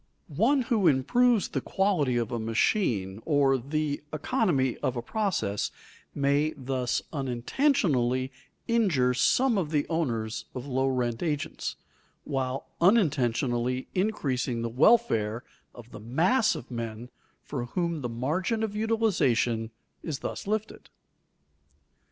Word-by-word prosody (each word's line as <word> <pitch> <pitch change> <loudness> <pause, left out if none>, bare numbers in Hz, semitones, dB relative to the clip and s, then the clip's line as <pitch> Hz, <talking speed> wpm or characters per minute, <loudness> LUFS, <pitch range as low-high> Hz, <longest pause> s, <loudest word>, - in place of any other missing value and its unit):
One 260 +6 +3
who 220 -6 +2
improves 220 - +3
the - - -2
quality 175 -11 +1
of 120 0 -1
a 120 - -2
machine 110 - 0
or 140 -3 +3
the 145 +3 -2
economy 155 - 0
of 130 - -2
a - - -1
process 195 - -1 0.5
may 145 +2 +1
thus 130 -2 -1
unintentionally 130 - +1 0.4
injure 180 - +2
some 240 - +3
of 165 -5 -2
the 150 -2 0
owners 115 -10 -2
of 125 0 -5
low 130 -1 0
rent 125 -3 -1
agents, 150 -4 -2 0.5
while 135 -1 -2 0.2
unintentionally 130 - +2
increasing 135 - -1
the 115 - -2
welfare 125 - +3 0.3
of 120 -1 -13
the - - -9
mass 170 - +2
of 125 - -9
men 115 0 -5 0.3
for 130 -4 -4
whom 170 +3 -2
the 120 - -3
margin 160 - -1
of 210 -2 -3
utilization 180 - +1 0.3
is 155 -5 -4
thus - - -4
lifted. 215 +1 -3
140 Hz, 120 wpm, -28 LUFS, 120-195 Hz, 0.5 s, One